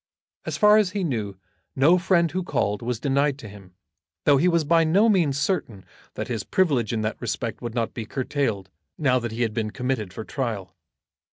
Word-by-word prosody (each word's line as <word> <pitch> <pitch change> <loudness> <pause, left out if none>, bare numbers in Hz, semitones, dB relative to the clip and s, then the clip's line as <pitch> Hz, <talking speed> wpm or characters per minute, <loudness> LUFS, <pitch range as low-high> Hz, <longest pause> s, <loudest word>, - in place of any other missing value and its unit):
As - - -2
far 210 0 +6
as 195 -4 0
he 200 -2 -1
knew 110 - -3 0.4
no 160 +7 +5
friend 170 -2 +2
who 185 - -2
called 105 - -1
was 120 -1 -3
denied 140 +1 +1
to 115 - -10
him, 95 -3 -14 0.5
though 145 -1 +5
he 165 +7 +3
was 170 -2 +2
by 165 +2 +3
no 190 +8 +4
means 170 -10 +2
certain 135 - -2 0.3
that 110 - -4
his 115 -4 -3
privilege 140 - +1
in 115 -2 -1
that 110 - -3
respect - - -3
would 120 -1 -5
not 115 -2 -1
be 115 -4 -6
curtailed 120 -8 -2 0.3
now 130 -4 +2
that 120 -2 -4
he 115 +2 -1
had 110 -2 -1
been 110 -1 -2
committed 125 -5 -3
for 110 - -7
trial. 110 -8 -4
130 Hz, 200 wpm, -24 LUFS, 110-165 Hz, 0.5 s, far